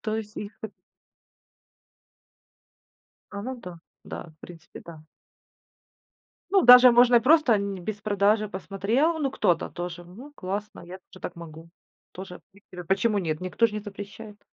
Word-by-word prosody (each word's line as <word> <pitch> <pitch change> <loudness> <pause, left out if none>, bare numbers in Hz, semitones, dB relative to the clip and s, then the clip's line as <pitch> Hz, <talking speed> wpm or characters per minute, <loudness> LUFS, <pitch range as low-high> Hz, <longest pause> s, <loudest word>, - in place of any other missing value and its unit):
То 220 -1 -3
есть 215 -1 -7
их, 205 +1 -8
вот 215 -2 -7 2.6
А, 200 0 -7
ну 260 +3 -5
да, 180 -4 -10 0.3
да. 165 - -8
В - - -56
принципе, 170 -1 -13
да. 165 -2 -12 1.5
Ну, 390 0 +4
даже 250 +1 +9
можно 240 0 +5
и - - +5
просто 285 -2 +4
н 200 -1 -2
без 210 +2 -4
продажи. 210 +1 +1
Посмотрел: 210 - -1
"Ну, 275 -3 -1
кто-то 175 -9 0
тоже, 175 0 -7
ну, 240 +12 -13
классно, 200 +1 -6
я 180 +2 -10
тоже 185 - -15
так - - -6
могу". 165 0 -12 0.4
Тоже, 185 -1 -9
в - - -32
принципе, 185 -3 -13
почему 205 +4 +1
нет? 155 -4 -3
Никто 185 +5 +1
же 215 - -9
не 210 - -3
запрещает. 205 +1 -10
205 Hz, 155 wpm, -25 LUFS, 180-230 Hz, 2.6 s, даже